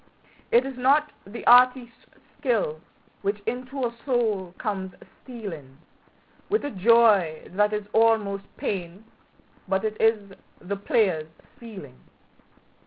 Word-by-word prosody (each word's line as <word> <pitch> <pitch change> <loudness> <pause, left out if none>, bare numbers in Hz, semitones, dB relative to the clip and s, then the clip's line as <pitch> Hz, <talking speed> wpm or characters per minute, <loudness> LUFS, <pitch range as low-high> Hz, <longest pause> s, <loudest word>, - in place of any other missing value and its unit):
It 240 +2 +4
is 270 -1 -6
not 285 +4 +3 0.2
the 220 +4 -9
artist's 245 -1 +4 0.3
skill 210 - -1 0.4
which 200 +1 -2
into 255 +3 -4
our 235 -1 -1
soul 220 -9 0
comes 190 -5 -4 0.3
stealing 170 - -9 0.7
With 425 -7 0
a 290 - -3
joy 205 -6 +4
that 210 +3 +2
is 210 -1 -3
almost 215 -3 +2
pain, 185 +1 -5 0.6
but 190 +2 0
it 215 0 -3
is 215 -3 +1 0.3
the 200 +3 -4
player's 190 -6 +1 0.3
feeling. 190 - -11
215 Hz, 115 wpm, -25 LUFS, 190-240 Hz, 0.7 s, It